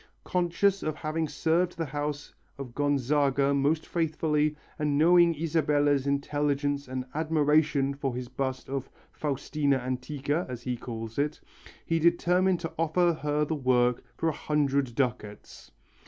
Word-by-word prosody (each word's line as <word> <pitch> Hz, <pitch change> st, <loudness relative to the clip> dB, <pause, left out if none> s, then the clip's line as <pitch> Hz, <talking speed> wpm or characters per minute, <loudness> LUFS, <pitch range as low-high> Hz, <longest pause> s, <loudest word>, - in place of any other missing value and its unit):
Conscious 180 Hz, +2 st, +1 dB
of 155 Hz, -1 st, -2 dB
having 155 Hz, +1 st, -2 dB
served 170 Hz, +4 st, 0 dB
the 165 Hz, -, -1 dB
house 145 Hz, 0 st, -4 dB, 0.2 s
of 135 Hz, -4 st, -7 dB
Gonzaga 140 Hz, 0 st, +2 dB
most 145 Hz, +3 st, +1 dB
faithfully 155 Hz, -2 st, 0 dB, 0.2 s
and 150 Hz, -1 st, +1 dB
knowing 170 Hz, +1 st, +5 dB
Isabella's 145 Hz, -3 st, +1 dB
intelligence 145 Hz, 0 st, 0 dB
and 130 Hz, 0 st, -4 dB
admiration 150 Hz, -2 st, +2 dB
for 140 Hz, -3 st, -3 dB
his 125 Hz, 0 st, -4 dB
bust 130 Hz, +1 st, -3 dB
of 135 Hz, -1 st, -4 dB, 0.2 s
"Faustina 145 Hz, -1 st, -1 dB
antica," 135 Hz, +5 st, -2 dB
as 120 Hz, -1 st, -6 dB
he 125 Hz, 0 st, -2 dB
calls 115 Hz, 0 st, -6 dB
it, 150 Hz, +1 st, -1 dB, 0.5 s
he 165 Hz, 0 st, +1 dB
determined 180 Hz, +2 st, +3 dB
to 165 Hz, -, -5 dB
offer 170 Hz, +2 st, +2 dB
her 150 Hz, 0 st, +1 dB
the 160 Hz, -, -2 dB
work 125 Hz, -4 st, +2 dB
for 165 Hz, -, +1 dB
a -, -, -2 dB
hundred 140 Hz, -5 st, 0 dB
ducats. 120 Hz, -6 st, -3 dB
145 Hz, 140 wpm, -28 LUFS, 135-160 Hz, 0.5 s, knowing